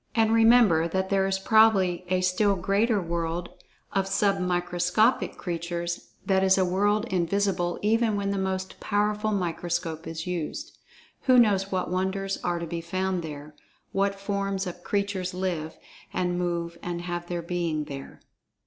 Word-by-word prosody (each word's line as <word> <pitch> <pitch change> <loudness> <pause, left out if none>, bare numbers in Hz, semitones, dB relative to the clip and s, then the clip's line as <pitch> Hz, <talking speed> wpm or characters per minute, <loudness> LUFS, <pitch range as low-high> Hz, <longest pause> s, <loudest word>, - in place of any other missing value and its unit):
And, 225 -1 +3
remember, 225 -8 +5
that 190 +2 -1
there 195 -1 +3
is 195 0 0
probably 195 -4 +4
a 185 0 +1
still 190 +2 +2
greater 200 +4 +1
world 170 0 -3 0.4
of 195 -1 +1
"sub 195 0 +2
microscopic" 180 +5 +1
creatures, 170 0 -4 0.2
that 190 -1 +2
is 190 0 +5
a 190 - +3
world 205 +4 +1
invisible 180 0 0
even 225 0 +2
when 200 -1 -1
the 200 - -1
most 190 0 -3
powerful 210 +1 0
microscope 170 -3 -2
is 165 0 -5
used. 175 -4 -4 0.5
Who 255 -1 +6
knows 200 -5 +4
what 185 -2 -1
wonders 190 +1 -1
are 175 -1 0
to 170 - -4
be 170 +1 -4
found 185 +1 -1
there—what 160 +6 -5
forms 195 -1 -2
of 175 -1 -7
creatures 200 -3 -2
live, 175 -4 -3 0.3
and 180 -1 -1
move 170 -1 -2
and 175 0 -4
have 175 -1 -4
their 175 -1 -3
being 170 -3 -1
there. 140 -2 -9
185 Hz, 150 wpm, -26 LUFS, 175-200 Hz, 0.5 s, Who